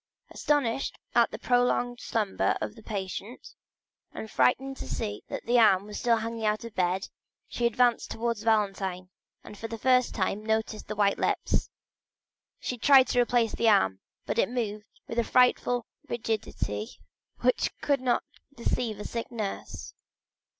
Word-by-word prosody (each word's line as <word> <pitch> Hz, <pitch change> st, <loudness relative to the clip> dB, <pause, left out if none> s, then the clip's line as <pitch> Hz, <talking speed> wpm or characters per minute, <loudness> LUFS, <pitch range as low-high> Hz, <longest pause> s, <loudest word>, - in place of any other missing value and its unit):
Astonished 275 Hz, -4 st, 0 dB, 0.2 s
at -, -, +4 dB
the -, -, -6 dB
prolonged 245 Hz, 0 st, +1 dB
slumber 210 Hz, -4 st, 0 dB
of -, -, -4 dB
the 225 Hz, -, -14 dB
patient, 205 Hz, +3 st, -6 dB, 0.6 s
and 220 Hz, -, -7 dB
frightened 270 Hz, +2 st, +2 dB
to -, -, -7 dB
see 105 Hz, 0 st, -3 dB
that -, -, -6 dB
the 240 Hz, +1 st, +4 dB
arm 195 Hz, -4 st, +5 dB
was 210 Hz, 0 st, -6 dB
still 235 Hz, -1 st, +3 dB
hanging 225 Hz, 0 st, -4 dB
out 215 Hz, 0 st, +1 dB
of 230 Hz, -, -7 dB
the 185 Hz, -, +1 dB
bed, 180 Hz, +2 st, 0 dB, 0.4 s
she 235 Hz, -, 0 dB
advanced 240 Hz, 0 st, +2 dB
towards 230 Hz, -1 st, -2 dB
Valentine, 195 Hz, -4 st, 0 dB, 0.3 s
and 210 Hz, -, -11 dB
for 225 Hz, -, -4 dB
the 225 Hz, 0 st, -6 dB
first 250 Hz, +2 st, +3 dB
time 200 Hz, +1 st, -1 dB
noticed 220 Hz, 0 st, -1 dB
the 215 Hz, -, -4 dB
white 200 Hz, -1 st, +2 dB
lips. -, -, 0 dB, 0.9 s
She 250 Hz, -, -4 dB
tried 265 Hz, +1 st, +6 dB
to 245 Hz, -, +3 dB
replace 240 Hz, -2 st, +2 dB
the 230 Hz, -, +3 dB
arm, 95 Hz, -, +3 dB, 0.3 s
but -, -, -1 dB
it -, -, +3 dB
moved 215 Hz, -4 st, -3 dB, 0.2 s
with 230 Hz, -, -2 dB
a -, -, +3 dB
frightful 245 Hz, 0 st, +3 dB, 0.2 s
rigidity 215 Hz, -, -3 dB, 0.4 s
which 250 Hz, +1 st, +2 dB
could 280 Hz, -2 st, +1 dB
not 250 Hz, -2 st, +1 dB, 0.3 s
deceive 235 Hz, -3 st, -1 dB
a -, -, -6 dB
sick 230 Hz, +1 st, -4 dB
nurse. 215 Hz, -4 st, -5 dB
225 Hz, 160 wpm, -28 LUFS, 210-245 Hz, 0.9 s, tried